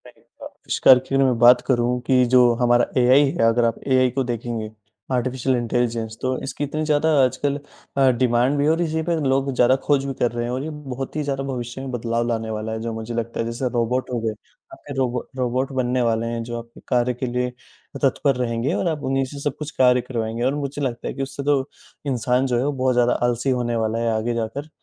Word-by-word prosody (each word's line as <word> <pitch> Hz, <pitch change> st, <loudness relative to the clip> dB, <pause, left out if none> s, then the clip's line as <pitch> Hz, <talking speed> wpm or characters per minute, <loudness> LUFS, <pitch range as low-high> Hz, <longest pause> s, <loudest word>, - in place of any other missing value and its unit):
नहीं -, -, -19 dB
हुआ। -, -, -12 dB
अविष्कार 130 Hz, -1 st, +4 dB
की 135 Hz, -, 0 dB
मैं 130 Hz, -3 st, +3 dB
बात 120 Hz, +1 st, +7 dB
करूँ 125 Hz, -1 st, +1 dB
कि 130 Hz, -2 st, +4 dB
जो 125 Hz, -1 st, +6 dB
हमारा 120 Hz, 0 st, +4 dB, 0.2 s
एआई 130 Hz, +4 st, +6 dB
है, 135 Hz, -4 st, 0 dB
अगर 115 Hz, +1 st, +3 dB
आप 115 Hz, -, +1 dB
एआई 130 Hz, -1 st, +4 dB
को 135 Hz, +2 st, -1 dB
देखेंगे, 115 Hz, -2 st, -4 dB, 0.4 s
आर्टिफिशियल 130 Hz, +1 st, 0 dB
इंटेलिजेंस, 115 Hz, -2 st, -1 dB
तो 130 Hz, 0 st, -1 dB
इसकी 135 Hz, +2 st, -4 dB
इतनी 155 Hz, +2 st, -2 dB
ज़्यादा 150 Hz, +1 st, +2 dB
आजकल 140 Hz, +2 st, 0 dB, 0.4 s
अ, 135 Hz, -1 st, +5 dB
डिमांड 125 Hz, +3 st, +2 dB
भी 140 Hz, -, +1 dB
है 150 Hz, -, +3 dB
और 165 Hz, +2 st, +1 dB
इसी 160 Hz, -1 st, -1 dB
पे 170 Hz, -, +2 dB
लोग 135 Hz, +1 st, +1 dB
ज़्यादा 125 Hz, +1 st, +4 dB
खोज 140 Hz, -2 st, +2 dB
भी 135 Hz, -, -3 dB
कर 120 Hz, -, +2 dB
रहे 120 Hz, 0 st, -3 dB
हैं 120 Hz, -, -3 dB
और 130 Hz, +2 st, -2 dB
ये 155 Hz, -, -4 dB, 0.2 s
बहुत 135 Hz, +1 st, -6 dB
ही 155 Hz, -, -1 dB
ज़्यादा 135 Hz, -1 st, -2 dB
भविष्य 125 Hz, -1 st, -5 dB
में 135 Hz, -1 st, -5 dB
बदलाव 115 Hz, -1 st, -1 dB
लाने 115 Hz, -1 st, -2 dB
वाला 110 Hz, 0 st, -4 dB
है, 110 Hz, -, -3 dB
जो 115 Hz, 0 st, -3 dB
मुझे 110 Hz, +1 st, -5 dB
लगता 115 Hz, 0 st, -3 dB
है। 115 Hz, -, 0 dB
जैसे 115 Hz, +2 st, -2 dB
रोबोट 120 Hz, +2 st, 0 dB
हो 120 Hz, -, 0 dB
गए, 110 Hz, -1 st, -1 dB, 0.4 s
आपके 145 Hz, -, -9 dB
रोबो 125 Hz, -2 st, -1 dB
रोबोट 130 Hz, +2 st, -1 dB
बनने 125 Hz, +1 st, 0 dB
वाले 115 Hz, -1 st, +1 dB
हैं, 115 Hz, 0 st, -3 dB
जो 120 Hz, 0 st, -5 dB
आपके 115 Hz, 0 st, -13 dB
कार्य 125 Hz, 0 st, +1 dB
के 125 Hz, +2 st, -4 dB
लिए 125 Hz, 0 st, -1 dB, 0.5 s
अ, -, -, -3 dB
तत्पर 135 Hz, +1 st, +1 dB
रहेंगे 120 Hz, +3 st, -1 dB
और 185 Hz, -, 0 dB
आप 155 Hz, -3 st, -2 dB
उन्हीं 135 Hz, 0 st, +1 dB
से 140 Hz, +2 st, -9 dB
सब 140 Hz, -1 st, -2 dB
कुछ 150 Hz, 0 st, -5 dB
कार्य 125 Hz, -1 st, +5 dB
करवाएँगे। 115 Hz, -1 st, -3 dB
और 130 Hz, +3 st, +1 dB
मुझे 145 Hz, 0 st, -4 dB
लगता 125 Hz, -4 st, -3 dB
है -, -, -3 dB
कि 135 Hz, -, -3 dB
उससे 140 Hz, +1 st, -6 dB
तो 140 Hz, -1 st, +1 dB, 0.4 s
इंसान 125 Hz, 0 st, +1 dB
जो 125 Hz, -2 st, 0 dB
है, 125 Hz, -, 0 dB
वो 145 Hz, -, +1 dB
बहुत 130 Hz, -2 st, 0 dB
ज़्यादा 125 Hz, 0 st, +3 dB
आलसी 120 Hz, +2 st, -1 dB
होने 120 Hz, -1 st, -1 dB
वाला 110 Hz, 0 st, -1 dB
है 115 Hz, 0 st, 0 dB
आगे 115 Hz, +2 st, -1 dB
जाकर, 120 Hz, +6 st, -4 dB
125 Hz, 235 wpm, -22 LUFS, 120-135 Hz, 0.5 s, बात